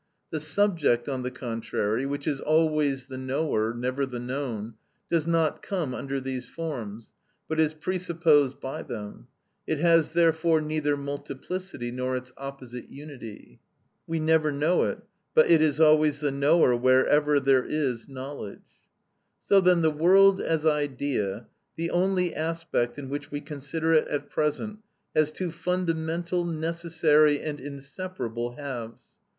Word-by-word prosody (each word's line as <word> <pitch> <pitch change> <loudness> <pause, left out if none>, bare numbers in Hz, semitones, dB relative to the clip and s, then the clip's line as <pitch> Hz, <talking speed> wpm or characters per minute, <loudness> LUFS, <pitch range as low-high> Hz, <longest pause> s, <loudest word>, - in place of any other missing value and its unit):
The 155 - -2
subject, 155 -6 +2
on 135 -2 -2
the 125 - -2
contrary, 115 -1 -2
which 140 0 -4
is 145 -3 -1
always 150 -4 +2
the 130 -1 -7
knower, 130 -4 0
never 125 +3 -2
the 125 -2 -6
known, 120 -4 -4 0.4
does 165 -2 +1
not 165 -2 +1
come 170 -10 -3
under 135 +1 -3
these 130 -1 -5
forms, 115 -10 -6 0.3
but 160 0 -2
is 155 0 +2
presupposed 165 -5 +2
by 135 - -5
them; 105 - -8 0.4
it 160 - 0
has 165 0 +4
therefore 165 0 +3
neither 155 -1 -1
multiplicity 140 +1 -5
nor 130 +1 -2
its 125 0 -8
opposite 135 -3 -8
unity. 140 -7 -11 0.5
We 165 0 -1
never 155 -1 +3
know 150 +5 +2
it, - - -4 0.3
but 475 - +6
it 165 -2 +6
is 155 -1 +2
always 155 -2 +5
the 145 -1 0
knower 140 -1 +4
wherever 130 +4 +4
there 135 -1 +3
is 135 -5 -2
knowledge. 135 -5 -9 0.6
So 195 -1 +5
then 180 -2 +4
the 160 - +4
world 190 +5 +5
as 160 -1 0
idea, 135 -8 0 0.3
the 165 +1 -3
only 180 -1 +1
aspect 160 -7 -2
in 140 -2 -6
which 145 +2 -5
we 145 - -4
consider 150 +2 -2
it 155 - +4
at 145 0 -4
present, 210 +8 -1 0.4
has 155 -1 +3
two 180 +1 -3
fundamental, 170 0 -1
necessary, 160 -2 +2
and 150 -2 -5
inseparable 135 - -5
halves. 120 -5 -7
150 Hz, 145 wpm, -27 LUFS, 130-165 Hz, 0.6 s, but